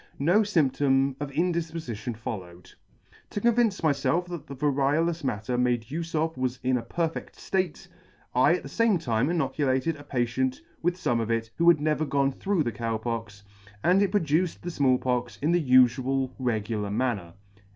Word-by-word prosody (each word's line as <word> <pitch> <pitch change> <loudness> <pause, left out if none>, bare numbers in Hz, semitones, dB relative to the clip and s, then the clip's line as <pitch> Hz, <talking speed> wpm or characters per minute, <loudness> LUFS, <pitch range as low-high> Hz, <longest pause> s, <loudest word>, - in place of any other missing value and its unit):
No 170 +9 +3
fymptom 140 -8 +2
of 145 -1 -4
indifpofition 160 -8 -2
followed. 90 -6 -7 0.6
"To - - -3
convince 230 -2 +2
myfelf 160 +3 +1
that 170 -4 -7
the 140 - -7
variolous 145 +4 +1
matter 120 0 -2
made 125 -2 +1
ufe 165 +6 -5
of 160 +1 0
was 130 0 -2
in 130 0 +2
a 125 - 0
perfedt 165 +5 -3
ftate, 185 -4 -2 0.5
I - - +4
at - - -5
the - - -7
fame 230 -4 +2
time 125 -4 0
inoculated 150 -3 0
a 145 - -11
patient 130 -1 -1 0.2
with 175 +1 +1
fome 120 -10 0
of 115 - -3
it 115 -1 -1
who 170 - +3
had 170 -3 +5
never 155 +1 0
gone 140 -1 +1
through 195 +3 0
the 120 - -2
Cow 115 -1 -2
Pox, 110 -3 -5 0.4
and 185 +3 +4
it 200 - +3
produced 170 -2 0
the 175 - -4
Small 135 -5 +3
Pox 125 -1 -2
in 150 +4 +1
the 175 -1 +2
ufual 130 +1 +3
regular 110 -4 -1
manner." 105 -6 -1
135 Hz, 170 wpm, -27 LUFS, 120-165 Hz, 0.6 s, had